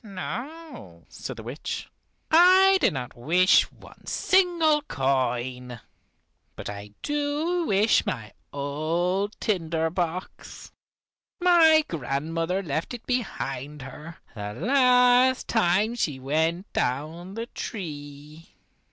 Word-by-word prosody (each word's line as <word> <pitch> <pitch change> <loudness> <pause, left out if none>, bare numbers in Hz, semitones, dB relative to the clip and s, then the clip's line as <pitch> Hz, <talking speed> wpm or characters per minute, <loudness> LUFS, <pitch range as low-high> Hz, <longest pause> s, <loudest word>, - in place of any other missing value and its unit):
"No," 225 - -8
said - - -7
the 110 - -8
witch: 125 +7 -5 0.4
"I 375 +3 +6
do - - +5
not 130 -2 -6
wish 175 +9 +3
one - - -17
single 340 -5 +2
coin. 125 - -2 0.8
But - - -6
I 100 0 -9
do 295 +4 -1
wish 205 +3 +3
my 110 -2 -5 0.2
old 165 +8 -2
tinder 165 -6 -1
box. 175 +1 -5 0.7
My 325 -3 +5
grandmother 165 +5 -2
left 160 - -3
it 235 - -12
behind 150 - -3
her, 150 +5 -10 0.2
the 105 -2 -6
last 250 - +4
time 210 +1 +2
she 150 - -2
went 160 +7 -1
down 160 +9 -3
the 230 +1 -4
tree." 150 -7 -8
175 Hz, 105 wpm, -25 LUFS, -, 0.8 s, I